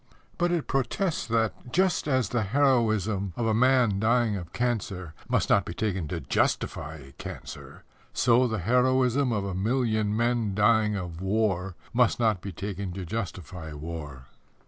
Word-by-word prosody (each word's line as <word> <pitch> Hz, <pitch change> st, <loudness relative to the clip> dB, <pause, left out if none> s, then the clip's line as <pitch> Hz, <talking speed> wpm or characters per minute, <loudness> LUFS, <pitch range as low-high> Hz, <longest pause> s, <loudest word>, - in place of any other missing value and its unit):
But 175 Hz, 0 st, +2 dB
it 170 Hz, -4 st, 0 dB
protests 135 Hz, +6 st, -1 dB
that, 115 Hz, +2 st, -1 dB
just 180 Hz, 0 st, +2 dB
as 130 Hz, -7 st, +1 dB
the 120 Hz, -, 0 dB
heroism 110 Hz, -5 st, +1 dB
of 120 Hz, -, -1 dB
a 110 Hz, -, +2 dB
man 125 Hz, -3 st, +3 dB
dying 115 Hz, 0 st, +2 dB
of 85 Hz, -4 st, -6 dB
cancer 95 Hz, -8 st, -2 dB, 0.2 s
must -, -, +2 dB
not -, -, +4 dB
be -, -, -7 dB
taken 95 Hz, -7 st, -1 dB
to -, -, -3 dB
justify 70 Hz, -2 st, -2 dB
cancer, -, -, -9 dB, 0.3 s
so 125 Hz, +1 st, +3 dB
the 110 Hz, -2 st, -2 dB
heroism 125 Hz, +5 st, +2 dB
of 100 Hz, -3 st, -1 dB
a 100 Hz, -, -3 dB
million 110 Hz, +1 st, 0 dB
men 115 Hz, -4 st, +1 dB
dying 105 Hz, 0 st, +3 dB
of 90 Hz, -3 st, -5 dB
war 95 Hz, -2 st, 0 dB, 0.2 s
must 120 Hz, 0 st, +3 dB
not 110 Hz, -6 st, +2 dB
be 100 Hz, -, -6 dB
taken 100 Hz, -1 st, -5 dB
to 95 Hz, 0 st, -5 dB
justify 85 Hz, -5 st, -5 dB
war. 75 Hz, -3 st, -7 dB
110 Hz, 155 wpm, -27 LUFS, 95-125 Hz, 0.3 s, not